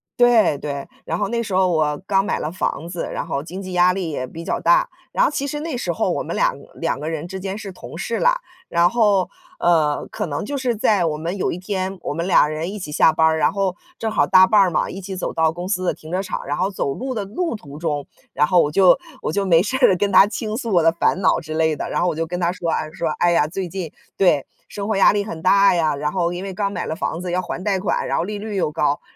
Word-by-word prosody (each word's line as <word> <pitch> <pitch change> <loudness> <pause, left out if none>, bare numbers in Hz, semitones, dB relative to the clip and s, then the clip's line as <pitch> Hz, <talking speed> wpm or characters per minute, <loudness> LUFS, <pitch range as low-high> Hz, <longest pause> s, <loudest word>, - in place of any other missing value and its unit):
对， 240 -11 +4
对， 140 -1 -5 0.2
然 165 - -2
后 205 - 0
那 235 +1 -1
时 205 -4 -6
候 185 0 +3
我 155 -3 +1
刚 195 -1 +3
买 - - -1
了 155 - -3
房 170 -2 -3
子， 175 -1 -4
然 - - -4
后 140 - -2
经 185 +4 -7
济 185 -1 -7
压 180 +1 +5
力 185 -4 -3
也 135 -4 -3
比 165 +6 -9
较 - - -1
大， - - +4 0.2
然 - - +2
后 - - +3
其 280 -1 -2
实 295 +1 -3
那 315 -3 -4
时 - - -2
候 - - 0
我 - - -1
们 - - -5
2 - - +1
个 - - -15
2 - - -2
个 155 - -4
人 160 +1 -4
之 190 +1 -6
间 195 +1 -4
是 200 -3 -7
同 165 - -10
事 230 +5 -2
啦， - - +3 0.3
然 170 +1 +3
后， 205 -4 +2 0.3
呃， 155 -4 +2
可 - - -3
能 145 +4 -3
就 280 +6 -3
是 250 -3 0
在 205 -3 +2
我 155 -2 0
们 170 +5 -4
有 - - -1
一 - - -5
天 190 0 -3
我 - - -3
们 170 +3 -3
俩 150 -5 +5
人 155 +3 -3
一 210 - -6
起 180 -6 -6
下 155 +2 +4
班 160 - +3
儿， 160 0 +3
然 - - +2
后 195 -2 -1 0.2
正 220 -1 -2
好 145 -8 +2
搭 185 0 +7
伴 210 +2 +4
儿 195 - +5
嘛， 165 - 0
一 190 - -7
起 190 0 -6
走 185 - -3
到 160 0 +1
公 175 +2 -6
司 185 -2 -1
的 - - +1
停 155 - -12
车 185 +2 0
场， 190 - -5
然 145 - -2
后 185 +2 +1
走 140 -8 -2
路 260 - -4
的 210 - -2
路 245 - -3
途 145 -8 -11
中， 150 -4 -2 0.3
然 150 - +3
后 175 +2 +4
我 145 - +1
就 185 +4 +5 0.2
我 - - -2
就 200 -1 0
没 170 -1 +4
事 260 +5 -1
了 185 - +3
跟 200 +2 0
他 195 +2 +7
倾 215 0 -4
诉 230 -6 -3
我 170 - +4
的 165 - +5
烦 170 +3 0
恼 - - +3
之 155 -1 -7
类 160 -1 +1
的， - - -4
然 - - -1
后 175 - +2
我 - - -2
就 165 0 -2
跟 175 +1 -4
他 170 0 +2
说 175 -2 -4
啊， 155 -1 -2
说： 165 +1 -3
“哎 175 - +4
呀， 150 -3 +3
最 180 +3 -4
近 175 -3 -5 0.2
对， 155 -8 +3 0.2
生 200 +1 -5
活 215 - +1
压 195 - +6
力 205 -1 0
很 165 -6 -7
大 195 +3 +5
呀， 160 -4 +1
然 150 +1 -2
后 175 -1 0
因 180 +2 -5
为 195 - -5
刚 200 +1 -2
买 180 - -3
了 - - -3
房 170 -2 -3
子 180 - -4
要 180 +1 0
还 180 0 -6
贷 195 -3 +1
款， 185 - -1
然 - - -1
后 - - 0
利 210 +1 -4
率 210 0 -5
又 175 -5 0
高， 150 -2 0
185 Hz, 305 characters per minute, -21 LUFS, 160-200 Hz, 0.3 s, 搭